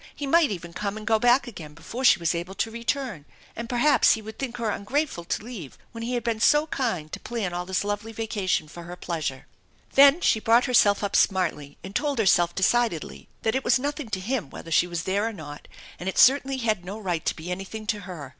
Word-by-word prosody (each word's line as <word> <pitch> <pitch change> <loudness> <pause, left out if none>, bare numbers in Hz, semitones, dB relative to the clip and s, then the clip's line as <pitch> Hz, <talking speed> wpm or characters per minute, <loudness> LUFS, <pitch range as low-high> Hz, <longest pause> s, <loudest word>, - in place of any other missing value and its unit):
He 290 - -5
might 320 +1 +4
even 170 -3 -6
come 205 +2 -3
and 215 - -8
go 220 0 +3
back 245 +3 +4
again 165 - -10
before 230 - -7
she 255 - +7
was 170 -1 0
able 175 +3 -5
to 225 - -2
return, 235 - -3 0.3
and 230 0 -6
perhaps 255 +5 +4
he 220 - -3
would 220 0 -10
think 245 -3 -4
her 230 -3 -1
ungrateful 255 - -2
to 190 - -3
leave 215 - -9
when 230 - -8
he 245 +2 -2
had 240 - -2
been 230 -2 -1
so 295 +6 +4
kind 225 - -3
to - - -6
plan 220 -7 -4
all 175 0 -4
this 190 0 0
lovely 205 +2 -3
vacation 210 -7 -1
for 170 +2 -10
her 175 +1 -8
pleasure. 155 -7 -4 0.5
Then 280 +3 +7
she 225 - +2
brought 230 +3 +4
herself 215 -6 +4
up 200 - -1
smartly 160 -7 +1
and 195 +2 -9
told 290 -2 0
herself 175 -5 +3
decidedly 220 -3 0
that 220 - +1
it 265 +1 -1
was - - +4
nothing 285 -1 -4
to 195 -3 -2
him 215 - -3
whether 165 - -10
she 170 +2 +4
was 170 -1 -4
there 200 +4 0
or 230 - -4
not, 145 -6 -10 0.3
and 180 - -3
it - - -6
certainly 270 0 +5
had 215 -7 -1
no 195 +4 -6
right 180 -6 -3
to - - -1
be 165 +3 -7
anything 195 +4 -6
to 210 0 -1
her. 175 -8 -8
210 Hz, 230 wpm, -25 LUFS, 175-240 Hz, 0.5 s, she